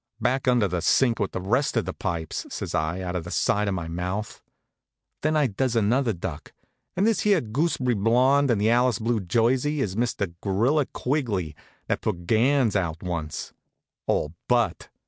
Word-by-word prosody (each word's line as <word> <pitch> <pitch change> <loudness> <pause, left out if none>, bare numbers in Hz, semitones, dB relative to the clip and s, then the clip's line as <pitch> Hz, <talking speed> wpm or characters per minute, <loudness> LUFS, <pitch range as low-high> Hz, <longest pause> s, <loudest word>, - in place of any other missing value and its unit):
"Back 130 +1 0
under 120 -5 +4
the 90 -2 -2
sink 120 +5 +3
with 100 - -1
the - - -3
rest 120 +10 0
of - - +1
the - - -4
pipes," 80 -2 -4
says - - -5
I, 80 +4 -1
out 90 -1 -4
of 90 - -2
the 85 - -8
side 105 +3 +1
of 100 - 0
my 85 -3 -4
mouth. 90 +5 -4 0.8
Then 155 +1 +1
I 150 - +3
does 125 +2 -1
another 115 +3 +2
duck. 85 -5 -6 0.4
"And 190 - +2
this 225 -4 +2
here 205 -3 +3
gooseb'ry 125 +1 0
blond 125 +7 +3
in 115 - +3
the 105 +3 +2
Alice 120 -2 +3
blue 115 +1 0
jersey, 120 - +1
is 100 -8 -1
Mr. 110 -6 -1
Gorilla 120 +9 +1
Quigley, 110 - -2 0.3
that - - -1
put 85 -5 -3
Gans 120 +3 +3
out 85 -3 -1
once 85 -4 -4 0.5
all 75 - 0
but. 120 -8 +1
110 Hz, 180 wpm, -25 LUFS, 90-130 Hz, 0.8 s, under